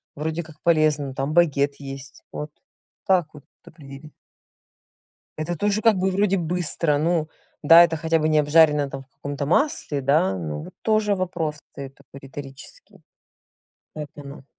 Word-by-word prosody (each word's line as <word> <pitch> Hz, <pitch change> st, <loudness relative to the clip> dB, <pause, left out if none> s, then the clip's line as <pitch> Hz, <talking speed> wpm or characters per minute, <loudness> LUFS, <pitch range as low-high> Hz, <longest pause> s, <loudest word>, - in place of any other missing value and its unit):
Вроде 160 Hz, +3 st, -3 dB
как 160 Hz, -1 st, -15 dB
полезно, 155 Hz, -4 st, +2 dB
там 135 Hz, +2 st, -2 dB
багет 145 Hz, -4 st, +2 dB
есть, 135 Hz, -1 st, -9 dB
вот 150 Hz, 0 st, -6 dB, 0.5 s
как 185 Hz, -5 st, +2 dB
вот 150 Hz, -, -13 dB, 0.2 s
определить? 140 Hz, 0 st, -13 dB, 1.3 s
Это 170 Hz, +3 st, -3 dB
тоже 205 Hz, +4 st, 0 dB
как 220 Hz, -3 st, +4 dB
бы 190 Hz, +1 st, 0 dB
вроде 195 Hz, 0 st, +1 dB
быстро. 165 Hz, -3 st, -1 dB
Ну 160 Hz, 0 st, 0 dB, 0.3 s
да, 165 Hz, +3 st, +8 dB
это 165 Hz, -1 st, -1 dB
хотя 165 Hz, +1 st, 0 dB
бы 155 Hz, 0 st, 0 dB
не 155 Hz, -1 st, +3 dB
обжарено 150 Hz, -1 st, +4 dB
там 135 Hz, 0 st, -7 dB
в 135 Hz, -, -39 dB
каком-то 140 Hz, 0 st, -5 dB
масле, 170 Hz, -, 0 dB
да. 130 Hz, -9 st, +2 dB
Ну 75 Hz, -3 st, -5 dB
вот -, -, -12 dB
тоже 215 Hz, -2 st, +2 dB
вопрос 175 Hz, -5 st, -3 dB
встает 140 Hz, -2 st, -11 dB
такой 140 Hz, 0 st, -15 dB
риторический. 135 Hz, 0 st, -12 dB, 0.9 s
Поэтому 145 Hz, -2 st, -9 dB
150 Hz, 150 wpm, -23 LUFS, 140-170 Hz, 1.3 s, да